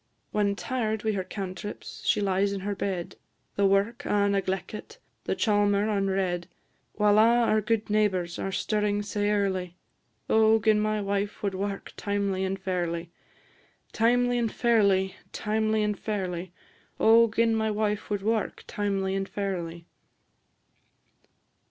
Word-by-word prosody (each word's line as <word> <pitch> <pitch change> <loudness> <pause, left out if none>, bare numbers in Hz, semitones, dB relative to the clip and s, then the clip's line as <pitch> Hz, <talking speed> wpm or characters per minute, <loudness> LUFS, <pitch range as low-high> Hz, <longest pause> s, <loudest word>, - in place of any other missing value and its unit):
When 205 -1 +1
tired 220 -2 -2
wi' 220 - +1
her 195 -3 -2
cantrips, 190 +1 -7
she - - +3
lies 200 0 +1
in 195 - -4
her 205 +1 -2
bed 190 -3 -4 0.4
The 200 -1 +3
wark 205 +7 +1
a' 205 -4 +2
negleckit, 195 +1 -3 0.3
the - - 0
chalmer 205 -2 +2
unred 195 -4 0 0.5
While 210 0 +4
a' 235 +2 +5
our 215 -1 +2
gude 220 +1 0
neighbours 190 -5 0
are 195 - -2
stirring 205 +1 0
sae 205 0 -1
early. 190 -4 0 0.5
O 220 0 +5
gin 215 -1 +3
my 215 0 0
wife 200 +1 -2
wad 200 -1 0
wark 195 +1 -4
timely 200 -2 -1
and 190 0 -1
fairly! 175 -2 -2 0.8
Timely 245 +2 +2
and 230 -2 0
fairly, 200 -5 +2 0.2
timely 215 0 0
and 210 -2 -1
fairly; 185 -4 -3 0.5
O 230 +1 +6
gin 230 0 +2
my 220 0 +1
wife 210 -1 -1
wad 205 -2 -2
wark 220 0 -1
timely 195 -2 -1
and 195 0 -2
fairly! 175 -4 -4
205 Hz, 140 wpm, -27 LUFS, 190-215 Hz, 0.8 s, O